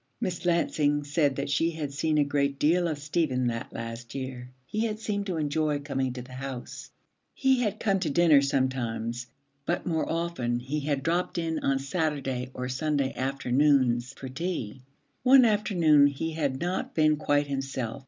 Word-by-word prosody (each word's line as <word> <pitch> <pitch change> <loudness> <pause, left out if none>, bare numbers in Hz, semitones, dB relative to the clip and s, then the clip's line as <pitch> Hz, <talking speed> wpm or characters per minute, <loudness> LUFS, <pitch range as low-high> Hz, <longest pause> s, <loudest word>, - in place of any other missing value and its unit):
Miss 180 0 -3
Lansing 145 -4 +2
said 145 -1 +1
that 140 +1 -3
she 165 +3 +2
had 155 -4 -5
seen 155 +2 0
a 150 - +5
great 140 -1 0
deal 170 +5 +3
of 155 -3 -2
Stephen 145 -3 0
that 115 -1 -3
last 115 +1 -7
year. 130 -2 -5 0.2
He 215 - -1
had 215 -1 -3
seemed 205 -2 -2
to 180 -3 -2
enjoy 150 0 0
coming 135 -2 -2
to 125 -1 -6
the 125 +1 -13
house. 130 -1 -7 0.5
He 265 -1 +3
had 210 -2 -1
come 195 -3 +1
to 175 -4 -1
dinner 155 -2 +5
sometimes, 120 -3 -1 0.4
but 175 +5 -2
more 160 -3 -1
often 165 -8 -1
he 135 +5 -3
had 140 -2 -1
dropped 175 +3 0
in 165 -1 -1
on 135 0 +1
Saturday 135 -3 -2
or 125 0 -3
Sunday 140 +1 -1
afternoons 130 -1 +2
for 135 - -7
tea. 130 - -4 0.4
One 260 0 +7
afternoon 175 -9 +4
he 145 +3 -3
had 145 -4 -1
not 180 +2 -3
been 155 -1 +4
quite 145 -1 +1
himself. 135 -3 -3
145 Hz, 175 wpm, -27 LUFS, 130-165 Hz, 0.5 s, One